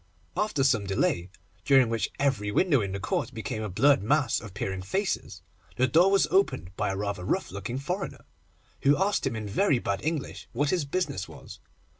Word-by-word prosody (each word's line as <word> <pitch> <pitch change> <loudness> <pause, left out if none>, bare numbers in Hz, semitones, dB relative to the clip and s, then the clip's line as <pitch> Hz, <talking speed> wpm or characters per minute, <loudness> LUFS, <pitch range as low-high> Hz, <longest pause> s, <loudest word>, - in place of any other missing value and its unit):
After 210 -10 0
some 115 -7 +2
delay, 95 -2 0 0.3
during 135 -4 +5
which 115 -1 -1
every 125 -8 0
window 145 - +3
in 100 -2 -3
the 100 - -3
court 125 +6 -2
became 110 -1 -4
a 105 - -3
blurred 135 +9 +4
mass 135 +3 +1
of 105 -5 -10
peering 95 -2 -3
faces, 95 - -2 0.3
the 130 - +3
door 165 +9 +5
was 195 -1 +4
opened 95 - +1
by - - -1
a 95 - -2
rather 100 -2 -3
rough - - -1
looking 100 +6 -4
foreigner, 180 +8 -4 0.6
who 145 +1 +4
asked 195 +2 +1
him - - -2
in 110 -1 -4
very 140 - +2
bad 100 -4 -2
English 155 -2 -3
what 145 +4 +1
his 175 -5 0
business 140 - -2
was. - - -11
125 Hz, 190 wpm, -27 LUFS, 100-150 Hz, 0.6 s, during